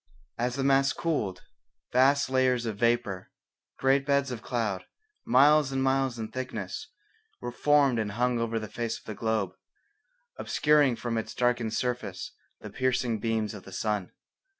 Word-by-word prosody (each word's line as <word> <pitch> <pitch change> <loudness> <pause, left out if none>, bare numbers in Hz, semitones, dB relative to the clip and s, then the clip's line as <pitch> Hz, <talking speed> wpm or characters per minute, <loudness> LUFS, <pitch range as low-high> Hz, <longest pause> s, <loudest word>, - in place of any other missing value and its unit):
As 120 +1 0
the 135 - -1
mass 135 0 +3
cooled, 110 - -2 0.5
vast 135 +3 +4
layers 130 -2 +2
of 110 -3 -3
vapour, 115 -5 0 0.5
great 135 +1 +3
beds 140 -1 +1
of 120 -3 -5
cloud, 110 -6 -2 0.4
miles 145 +3 +5
and 135 0 0
miles 135 -2 +1
in 110 -1 -5
thickness, 130 +1 -5 0.5
were 120 - -5
formed 140 -2 +3
and 105 -2 -2
hung 120 +1 +1
over 115 0 -1
the 110 -1 -4
face 115 +1 -3
of - - -19
the 110 - -5
globe, 110 -2 -1 0.9
obscuring 150 -4 +3
from 115 0 -2
its 110 0 -6
darkened 120 -3 +1
surface 120 -7 -3 0.3
the - - -8
piercing 125 -3 0
beams 110 -1 -1
of 105 - -8
the 95 - -13
sun. 105 -1 -2
120 Hz, 155 wpm, -28 LUFS, 110-135 Hz, 0.9 s, miles